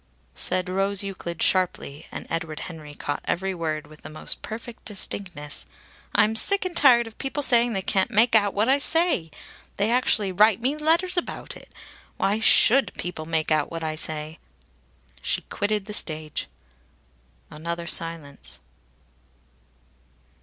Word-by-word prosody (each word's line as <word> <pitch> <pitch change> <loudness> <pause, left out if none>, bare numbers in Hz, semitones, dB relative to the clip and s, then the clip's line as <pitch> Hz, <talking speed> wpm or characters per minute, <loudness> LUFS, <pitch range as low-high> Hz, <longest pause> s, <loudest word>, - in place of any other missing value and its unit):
Said 185 0 +1
Rose 195 +2 0
Euclid 180 -4 -4
sharply, 175 -5 0
and - - -6
Edward 165 -2 -4
Henry 155 -4 -8
caught 145 - -3
every 190 +2 -1
word 155 -3 -3
with 155 +1 -16
the - - -9
most 155 - -5
perfect 230 +1 -8
distinctness: 180 -7 -4 0.5
"I'm 220 +1 +4
sick 395 - +3
and 365 -2 -4
tired 245 -6 +6
of 225 -1 -12
people 275 +2 -1
saying 240 -2 +4
they 190 -2 -2
can't 190 -1 +2
make 225 +2 +4
out 205 -3 +4
what 210 +3 +2
I 270 +2 +4
say! 325 - +1 0.5
They 205 +3 +1
actually 230 -5 +3
write 210 +2 +4
me 260 +5 0
letters 335 +4 +2
about 350 - -4
it! - - -13 0.5
Why 205 +3 +1
should 245 +4 +5
people 160 -3 -5
make 160 -1 -1
out 155 -2 +2
what 165 -1 -5
I 155 -1 -2
say?" 155 0 -3 0.8
She - - -1
quitted 205 -1 -1
the 210 - -7
stage. 155 -5 -1 1.0
Another 170 +2 -5
silence.... 165 -4 -2
195 Hz, 145 wpm, -25 LUFS, 160-230 Hz, 1.0 s, tired